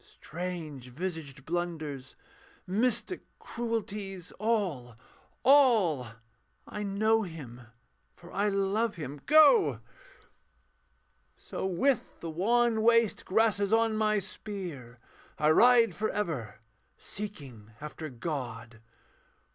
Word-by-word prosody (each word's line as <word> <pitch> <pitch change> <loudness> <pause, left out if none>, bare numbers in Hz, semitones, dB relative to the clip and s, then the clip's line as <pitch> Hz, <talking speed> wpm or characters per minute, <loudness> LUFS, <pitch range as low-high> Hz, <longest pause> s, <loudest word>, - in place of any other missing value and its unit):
Strange 160 -4 -6
visaged 145 -2 -6
blunders, 155 -6 -4 0.5
mystic 235 - 0 0.2
cruelties. 210 -6 -4
All! 185 - -1 0.5
all! 225 - +5 0.6
I 210 - -6
know 215 +2 +2
Him, 135 - -8 0.5
for 175 0 -14
I 205 +1 0
love 200 +3 0
Him. 145 -3 -7
Go! 315 - +6 1.6
So, - - -5
with 215 +8 0
the 165 - -5
wan 225 +6 +2
waste 230 -1 +3
grasses 205 -1 +2
on 225 0 +3
my 215 -1 +2
spear, 180 - -6 0.4
I 150 +1 +3
ride 235 +5 +6
for 215 +1 -2
ever, 155 - -3 0.4
seeking 140 - -8
after 150 +1 -7
God. 120 -4 -6
190 Hz, 95 wpm, -29 LUFS, 150-220 Hz, 1.6 s, Go